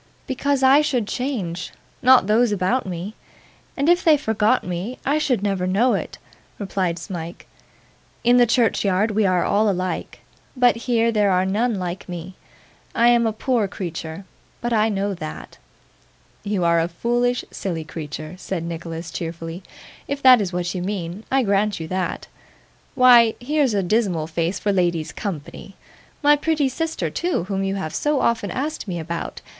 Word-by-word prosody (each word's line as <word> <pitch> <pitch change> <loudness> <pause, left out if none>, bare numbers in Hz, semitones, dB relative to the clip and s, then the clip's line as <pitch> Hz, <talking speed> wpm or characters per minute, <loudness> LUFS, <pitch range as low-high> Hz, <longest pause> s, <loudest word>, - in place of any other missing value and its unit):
'Because 275 0 -1
I 270 +3 +6
should 260 -8 0
change; 200 -11 -3 0.3
not 255 -4 +6
those 220 +3 +3
about 205 +5 0
me. 180 +3 -5 0.6
And 280 +1 0
if 350 +1 +4
they 315 -2 +6
forgot 220 -2 +1
me, 180 +8 -4
I 290 +3 +2
should 250 -9 0
never 195 -3 0
know 215 +7 +3
it,' - - -3 0.4
replied 190 -4 -2
Smike. 170 -1 -7 0.8
'In 240 +1 +5
the 245 -1 +5
churchyard 215 -3 +2
we 210 -1 +2
are 180 -1 +2
all 210 +1 +2
alike, 185 -1 -3 0.4
but 250 -1 +4
here 230 0 +1
there 210 -2 +2
are 185 0 +2
none 220 +5 0
like 180 -1 -5
me. 175 +1 -6 0.6
I 235 +1 +5
am 235 -1 +4
a - - +1
poor 225 0 0
creature, 175 -2 -6 0.3
but 240 0 -2
I 220 0 +3
know 200 -1 -1
that.' 75 - -8 0.8
'You 200 -3 -1
are 170 0 +4
a 165 - +1
foolish, 240 +7 0
silly 170 -5 -4
creature,' 155 0 -7
said 190 -3 -4
Nicholas 165 0 -6
cheerfully. 165 +1 -6 0.5
'If 280 0 -3
that 255 -3 +8
is 190 -3 -2
what 180 0 -2
you 180 - -3
mean, 185 +1 -4
I 270 0 +3
grant 205 -1 +1
you 160 - -5
that. 185 0 -2 0.7
Why, 240 -3 +6
here's 275 -2 +1
a 200 - +1
dismal 185 -5 +1
face 165 +3 -2
for 205 - 0
ladies' 175 -4 0
company! 195 +1 -7 0.5
my 295 +1 +6
pretty 295 -2 0
sister 320 +5 -3
too, 350 - -1
whom 195 +1 -2
you 195 0 -1
have 160 -6 -4
so 295 -2 0
often 225 -5 0
asked 285 - -4
me 180 -2 -3
about. 170 +1 -5
205 Hz, 165 wpm, -22 LUFS, 180-245 Hz, 0.8 s, that